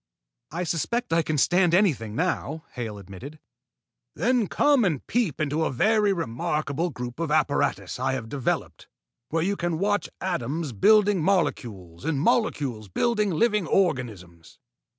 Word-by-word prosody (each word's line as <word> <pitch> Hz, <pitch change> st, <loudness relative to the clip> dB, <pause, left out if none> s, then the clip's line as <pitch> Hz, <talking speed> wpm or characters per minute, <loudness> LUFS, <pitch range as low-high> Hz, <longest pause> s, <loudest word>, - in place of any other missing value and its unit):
"I 170 Hz, +3 st, -3 dB
suspect 175 Hz, +5 st, -1 dB
I 165 Hz, -, +4 dB
can 155 Hz, -1 st, -2 dB
stand 175 Hz, +4 st, +3 dB
anything 135 Hz, -, +1 dB
now," 160 Hz, -1 st, -2 dB
Hale 115 Hz, -4 st, -5 dB
admitted. 100 Hz, +10 st, -10 dB, 0.8 s
"Then 245 Hz, -3 st, +1 dB
come 285 Hz, +2 st, +3 dB
and 160 Hz, -9 st, -1 dB
peep 210 Hz, -, -1 dB
into 155 Hz, +1 st, 0 dB
a -, -, +1 dB
very 210 Hz, -, +3 dB
remarkable 155 Hz, +1 st, -2 dB
group 125 Hz, -2 st, -7 dB
of 165 Hz, -2 st, -2 dB
apparatus 140 Hz, -10 st, 0 dB
I 130 Hz, +1 st, 0 dB
have 125 Hz, -4 st, -4 dB
developed, 135 Hz, +1 st, -3 dB, 0.4 s
where 165 Hz, +1 st, 0 dB
you 200 Hz, +3 st, 0 dB
can 175 Hz, -3 st, -2 dB
watch 205 Hz, +3 st, 0 dB
atoms 160 Hz, -3 st, -2 dB
building 205 Hz, -, +4 dB
molecules 115 Hz, -, -1 dB
and 155 Hz, -2 st, -1 dB
molecules 145 Hz, -, 0 dB
building 210 Hz, -, +1 dB
living 210 Hz, +1 st, +1 dB
organisms." 110 Hz, -, -2 dB
160 Hz, 140 wpm, -25 LUFS, 125-195 Hz, 0.8 s, I